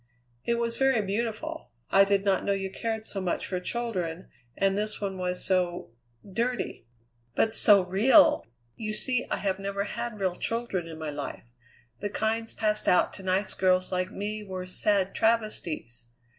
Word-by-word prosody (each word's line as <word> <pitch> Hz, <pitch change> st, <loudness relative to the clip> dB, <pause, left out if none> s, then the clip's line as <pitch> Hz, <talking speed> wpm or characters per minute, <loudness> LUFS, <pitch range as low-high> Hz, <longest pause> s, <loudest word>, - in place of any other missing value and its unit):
"It 235 Hz, -, +2 dB
was 235 Hz, 0 st, -1 dB
very 270 Hz, -3 st, +4 dB
beautiful. 235 Hz, +10 st, -3 dB, 0.2 s
I 195 Hz, 0 st, +7 dB
did 200 Hz, 0 st, +1 dB
not 195 Hz, -1 st, +2 dB
know 200 Hz, -, +1 dB
you 195 Hz, -1 st, -3 dB
cared 220 Hz, +1 st, -3 dB
so 195 Hz, -, -4 dB
much 180 Hz, -2 st, -1 dB
for 185 Hz, -, -2 dB
children, 185 Hz, -6 st, -3 dB, 0.3 s
and 195 Hz, 0 st, +2 dB
this 215 Hz, +1 st, -2 dB
one 195 Hz, -2 st, -3 dB
was 180 Hz, 0 st, -2 dB
so 180 Hz, -6 st, 0 dB, 0.4 s
dirty." 230 Hz, -, -2 dB, 0.5 s
"But 220 Hz, -, +2 dB
so 200 Hz, -3 st, +7 dB
real! 210 Hz, -, +5 dB, 0.3 s
You 215 Hz, -1 st, -4 dB
see 250 Hz, +2 st, +2 dB
I -, -, 0 dB
have 195 Hz, -1 st, -1 dB
never 200 Hz, 0 st, -2 dB
had 215 Hz, +1 st, -5 dB
real 190 Hz, -2 st, +1 dB
children 210 Hz, -3 st, -2 dB
in 160 Hz, -1 st, -8 dB
my 155 Hz, -1 st, -4 dB
life. 145 Hz, -4 st, -6 dB, 0.5 s
The 205 Hz, -, -2 dB
kinds 225 Hz, +2 st, -1 dB
passed 215 Hz, -1 st, -1 dB
out 180 Hz, -, +4 dB
to -, -, -9 dB
nice 190 Hz, +1 st, 0 dB
girls 185 Hz, -1 st, +2 dB
like 185 Hz, 0 st, 0 dB
me 210 Hz, +1 st, -4 dB
were 185 Hz, -2 st, -5 dB
sad 195 Hz, +1 st, +1 dB
travesties. 215 Hz, -, -1 dB
200 Hz, 170 wpm, -28 LUFS, 185-220 Hz, 0.5 s, I